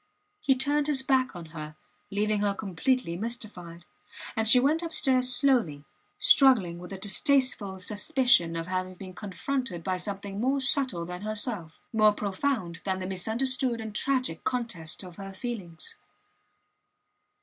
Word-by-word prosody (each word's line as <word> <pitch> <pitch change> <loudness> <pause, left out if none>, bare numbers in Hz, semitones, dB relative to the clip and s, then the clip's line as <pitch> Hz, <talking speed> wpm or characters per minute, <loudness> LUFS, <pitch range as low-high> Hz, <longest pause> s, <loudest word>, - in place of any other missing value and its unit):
He 270 - +3
turned 290 +3 +1
his 275 -3 +2
back 260 -4 +2
on 170 -2 -8
her, 155 -1 -7 0.3
leaving 210 +1 0
her 200 -1 +1
completely 200 +1 -1
mystified. 190 -6 -6 0.5
And 220 0 0
she 250 +3 +8
went 295 +6 +2
upstairs 265 -6 +1
slowly, 240 - +2 0.3
struggling 210 -11 +5
with 180 +2 -10
a 195 - -5
distasteful 205 0 +1
suspicion 205 - +2
of 165 0 -3
having 185 +1 -3
been 185 0 -9
confronted 205 0 -3
by 185 +1 -1
something 200 +2 -5
more 270 +3 +2
subtle 265 - +1
than 180 +1 -7
herself 210 -6 -3
more 215 -1 +5
profound 200 -3 -2
than 190 -1 -1
the 185 - -4
misunderstood 235 +6 0
and 220 -1 -6
tragic 255 -7 0
contest 225 -11 -2
of 180 -2 -11
her 195 -1 -7
feelings. 190 -7 -6
210 Hz, 140 wpm, -28 LUFS, 180-255 Hz, 0.5 s, she